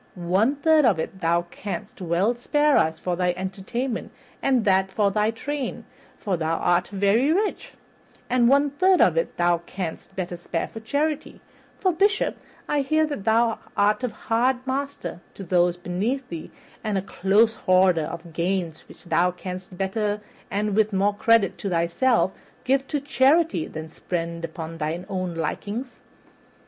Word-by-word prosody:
One 190 +9 +1
third 310 +1 +4
of 225 -9 +4
it 190 +4 -5
thou 170 +1 +2
canst 200 -1 -6
well 180 +6 +1
spare 295 +5 +2
to - - +6
us 160 0 -1
for 180 +1 -2
thy 180 0 0
entertainment 195 +7 -4 0.3
and 260 -4 +2
that 190 -1 +2
of 200 -2 +3
thy 210 +1 +2
train, 275 +4 -4 0.3
for 195 -5 -1
thou 160 0 0
art 175 0 +2
very 205 +8 +2
rich; 410 +5 -1 0.5
one 260 +4 +4
third 370 +5 +3
of - - +5
it - - -1
thou 175 -1 +3
canst 175 +1 -6
better 180 -2 -3
spare 170 -1 -3
for 225 - -9
charity, 285 +6 -2 0.4
for, 375 - +2
Bishop, 400 +5 +2 0.3
I 295 -1 +1
hear 310 +3 +2
that 285 -10 -5
thou 225 0 +3 0.2
art 210 +5 +3
a - - +2
hard 250 +4 0
master 275 -7 -3 0.2
to 195 - -7
those 175 -1 +2
beneath 205 +10 -2
thee 165 -2 -6 0.3
and 215 -3 -1
a 190 - -1
close 205 +4 +3
hoarder 185 -5 +3
of 170 +1 -8
gains 170 -1 -2
that - - -15
thou 175 +1 +3
couldst 180 0 -7
better 205 +2 -1 0.3
and 205 0 -1
with 215 -1 +2
more 200 +2 +2
credit 215 -1 +3
to 200 - -3
thyself 185 +6 +2 0.3
give 270 +1 +1
to 295 - -1
charity 275 - +3
than 155 0 -7
spend 170 0 -4
upon 165 0 -6
thy 160 +4 -3
own 185 -3 -3
likings." 205 - -4
200 Hz, 160 wpm, -24 LUFS, 175-255 Hz, 0.5 s, to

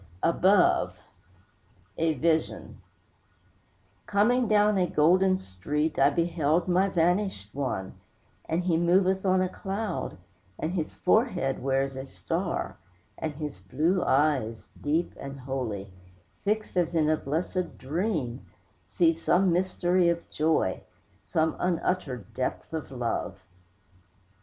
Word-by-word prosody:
ABOVE 185 +3 +3 1.0
A 160 -1 +2
VISION 160 +3 -1 1.3
Coming 235 +4 +3
down 210 -1 +4
a 180 - +2
golden 185 +5 +4
street 150 - -2
I 140 - +6
beheld 165 +1 +1
my 185 +2 +3
vanished 175 - 0
one, 130 -9 -3 0.6
And 165 +3 0
he 175 -2 +2
moveth 185 +3 +2
on 185 0 +4
a - - +1
cloud, 195 - -4 0.4
And 160 - -2
his 165 -5 -3
forehead 185 - +1
wears 135 0 0
a 135 0 -5
star; 90 -5 -3 0.4
And 155 -2 -3
his 150 - -6
blue 155 - 0
eyes, 135 -6 +1
deep 160 +4 0
and 140 0 -7
holy, 115 -8 -4 0.5
Fixed 215 0 -1
as 175 -1 +1
in 155 -2 +3
a 155 - +4
blessèd 165 +5 -3
dream, 150 - -2 0.4
See 165 -2 +2
some 175 +3 +2
mystery 180 0 +2
of 170 0 -2
joy, 155 -11 +1 0.4
Some 160 0 0
unuttered 165 - -1
depth 130 +4 -3
of 160 -2 -4
love. 120 -3 -3
165 Hz, 120 wpm, -27 LUFS, 135-185 Hz, 1.3 s, I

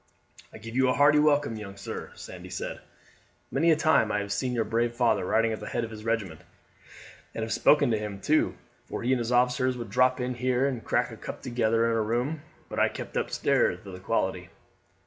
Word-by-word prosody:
"I - - -10
give 115 +1 -9
you 130 0 +3
a 125 - +2
hearty 145 +1 +5
welcome, 145 -6 +2
young 100 -2 -8
sir," 100 - -6
Sandy - - -10
said. - - -5 0.7
"Many 170 - +2
a 160 - +6
time 155 -8 +3
I 105 - +1
have 100 0 -2
seen 125 +3 -1
your 115 -2 +1
brave 115 +2 0
father 115 -5 +2
riding 115 +4 +2
at 110 - -5
the - - -7
head 120 - -2
of 115 - -5
his 105 -1 -9
regiment, 110 -8 -2 0.9
and 110 - -2
have 110 - -2
spoken 145 -4 +4
to 110 - +1
him 105 -2 -5
too, 155 +9 +2 0.3
for - - -5
he 125 - +1
and 130 - +1
his 120 0 -2
officers 125 +1 +2
would 115 -4 -7
drop 125 +3 +3
in 125 0 -2
here 125 +1 +1
and 130 -5 -2
crack - - 0
a - - -9
cup - - -8
together 115 -2 +1
in 115 0 +1
a 110 - +1
room 120 +8 -1 0.3
I - - +3
keep - - -8
upstairs - - +1
for 100 - -9
the 90 - -8
quality. 95 -3 -1
115 Hz, 220 wpm, -27 LUFS, 110-130 Hz, 0.9 s, a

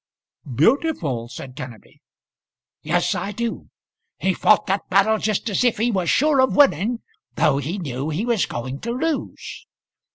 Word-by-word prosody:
"Beautiful!" 155 - +1
said 130 0 -9
Kenneby. 120 -5 -10 0.8
"Yes, - - +1
I 200 - -3
do. 235 +2 -4 0.5
He 190 - +1
fought 215 +3 +3
that 195 +1 -2
battle 200 +3 +3
just 215 +2 -1
as 205 +2 +1
if 245 -2 +2
he 235 +3 +1
was 185 -5 0
sure 290 -1 +3
of 260 - +2
winning, 235 - +3 0.3
though 135 - +2
he 155 +8 -3
knew 140 -4 -4
he 165 +9 -2
was 235 -5 +1
going 130 +3 -5
to 235 - -6
lose. 315 +4 -4
200 Hz, 155 wpm, -22 LUFS, 145-235 Hz, 0.8 s, fought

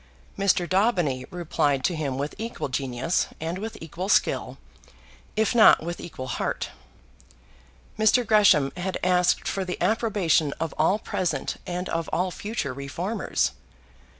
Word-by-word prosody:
Mr. 195 -3 +2
Daubeny 180 - +1
replied 150 -6 0
to 175 - +1
him 140 -4 -2
with 145 +2 -3
equal 225 -9 -4
genius, 130 +4 -1
and 165 +3 -3
with 220 +2 -6
equal 170 +4 -5
skill, - - +1 0.8
if 220 -1 +2
not 225 -8 +7
with 170 +1 -4
equal 130 -6 -7
heart. 125 - -2 1.3
Mr. 225 +3 +4
Gresham 195 -11 +5
had 185 +1 -2
asked 180 0 +2
for 195 - -1
the 180 -1 -5
approbation 195 -10 +2
of 165 -1 -2
all 160 +6 +3
present 185 -4 -2
and 180 +1 -3
of 165 -1 -2
all 180 +1 0
future 205 - -4
reformers. 170 - -2
Mr. - - -23
175 Hz, 140 wpm, -25 LUFS, 150-200 Hz, 1.3 s, not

